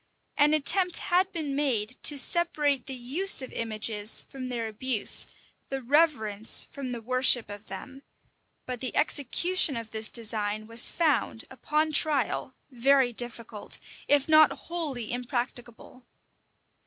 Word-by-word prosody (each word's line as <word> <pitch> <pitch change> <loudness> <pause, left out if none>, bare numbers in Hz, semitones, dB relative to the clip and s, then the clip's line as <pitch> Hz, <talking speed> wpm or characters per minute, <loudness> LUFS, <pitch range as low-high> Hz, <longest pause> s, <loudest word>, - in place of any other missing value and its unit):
[] - - -45
An 295 +1 +5
attempt 360 +4 +3
had 370 +2 +1
been 310 -6 -4
made 255 -5 0
to 295 - +4
separate 295 -2 +1
the 265 - -4
use 280 +11 0
of 260 - -8
images 215 -1 -2
from 260 -2 -7
their 235 -2 -3
abuse, 220 +1 0 0.4
the 270 - -3
reverence 240 -6 +1
from 280 -4 -6
the 240 -2 -6
worship 255 -2 +3
of 205 +1 -10
them; 260 +8 -9 0.6
but 250 -1 -5
the 255 - -4
execution 310 +1 +2
of 230 -1 -7
this 220 -1 0
design 215 -2 -2
was 230 +2 +3
found, 295 -8 0
upon 305 +4 -1
trial, 280 -4 +1 0.2
very 260 0 +2
difficult, 230 -2 -3 0.3
if 285 -1 +3
not 310 -1 +6
wholly 290 -10 -5
impracticable. 245 0 -5
255 Hz, 135 wpm, -27 LUFS, 230-295 Hz, 0.6 s, not